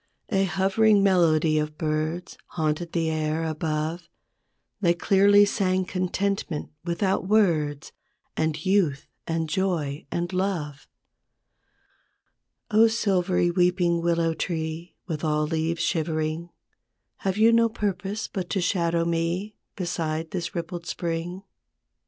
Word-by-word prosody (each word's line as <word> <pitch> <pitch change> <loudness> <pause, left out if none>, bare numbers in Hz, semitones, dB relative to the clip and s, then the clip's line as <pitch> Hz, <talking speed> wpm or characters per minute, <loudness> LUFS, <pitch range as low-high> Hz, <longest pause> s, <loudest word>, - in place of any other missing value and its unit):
I 195 - +2
A 195 - +3
hovering 195 +3 +3
melody 160 -5 +3
of 150 0 -3
birds 155 +3 -2
Haunted 160 +1 -2
the 165 -2 0
air 155 +1 -1
above; 160 +1 -2 0.7
They 175 -4 +3
clearly 200 +3 +5
sang 185 -2 0
contentment 185 -2 -2
without 185 +2 0
words, 160 -9 +2 0.4
And 160 0 -1
youth 185 -8 +2 0.2
and 165 0 -1
joy 160 -6 -1
and 175 +2 -2
love. 175 -7 -2 1.8
O 220 +2 +6
silvery 185 -5 +1
weeping 175 -1 +2
willow 170 -1 +1
tree 160 +1 -4
With 160 -3 -4
all 150 -1 +1
leaves 160 +1 -1
shivering, 160 0 -1 0.7
Have 190 0 -2
you 225 +2 +5
no 230 0 +4
purpose 210 -1 -3
but 185 -4 -5
to 195 - 0
shadow 170 -2 +1
me 170 +5 -1 0.2
Beside 165 -3 -3
this, 175 -2 -4
rippled 170 0 -5
spring? 175 +2 -3
170 Hz, 115 wpm, -25 LUFS, 160-190 Hz, 1.8 s, O